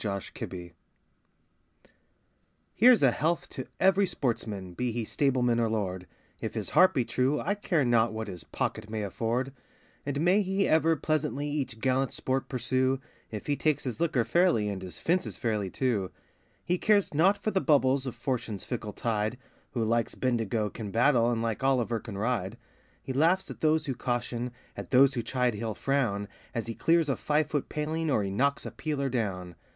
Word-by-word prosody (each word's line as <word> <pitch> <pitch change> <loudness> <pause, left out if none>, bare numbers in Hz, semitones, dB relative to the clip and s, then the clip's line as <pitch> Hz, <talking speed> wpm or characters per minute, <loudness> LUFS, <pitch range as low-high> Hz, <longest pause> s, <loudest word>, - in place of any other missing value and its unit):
A 105 - -1
Hunting 100 -1 -5
Song 90 -2 -8 2.0
Here's 245 - +6
a 130 - +6
health 170 +6 0
to - - -6
every 190 +1 +4
sportsman, 110 - -3
be 125 +6 -1
he 115 0 -3
stableman 125 -2 +1
or 115 -1 +2
lord, 95 -4 -2 0.3
If - - -4
his - - -3
heart 185 +1 +5
be 125 - +2
true, 130 +5 +1
I 200 - 0
care 175 -8 0
not 120 -1 +3
what 110 0 -4
his 90 -4 -7
pocket 110 -1 -3
may 110 -1 -3
afford; 120 +6 -2 0.5
And 145 +1 -2
may 180 +5 +4
he 195 0 +1
ever 160 +1 +4
pleasantly 150 -1 -1
each 135 -6 -3
gallant 130 +2 +1
sport 130 0 -2
pursue, 130 +1 0 0.3
If 105 -2 -6
he 145 - +1
takes 155 0 0
his 125 0 -4
liquor 155 -8 +2
fairly, 170 - +3
and 100 -2 -4
his 95 -1 -8
fences 175 +2 -1
fairly, 105 -5 -1
too. 105 -5 0 0.6
He 180 0 0
cares 205 -5 +3
not 185 +7 +4
for 215 +2 -2
the 190 - +1
bubbles 135 -3 +3
of 125 - -4
Fortune's 120 -5 -3
fickle 110 -4 -5
tide, 110 0 -1 0.4
Who 120 -3 0
like 115 0 0
Bendigo 115 -4 0
can 110 -3 -6
battle, 120 +2 +3
and 115 -1 0
like 115 -2 -2
Olliver 125 -4 +1
can 105 -3 -8
ride. 105 -3 -1 0.5
He 130 - -4
laughs 170 +7 +2
at - - -11
those 155 0 +2
who 135 - -1
caution, 120 0 -2 0.3
at - - -7
those 135 +1 +6
who 120 - -1
chide 125 +1 0
he'll 110 0 -4
frown, 115 -8 0 0.3
As 115 - -1
he 115 - -4
clears 165 +5 +2
a 135 - +1
five 150 +1 +1
foot 145 -3 -1
paling, 155 +1 -2
or 110 -7 +2
he 100 - -3
knocks 140 +8 +1
a - - -5
peeler 145 -3 -2
down. 95 -8 -2
125 Hz, 185 wpm, -29 LUFS, 110-150 Hz, 2.0 s, Here's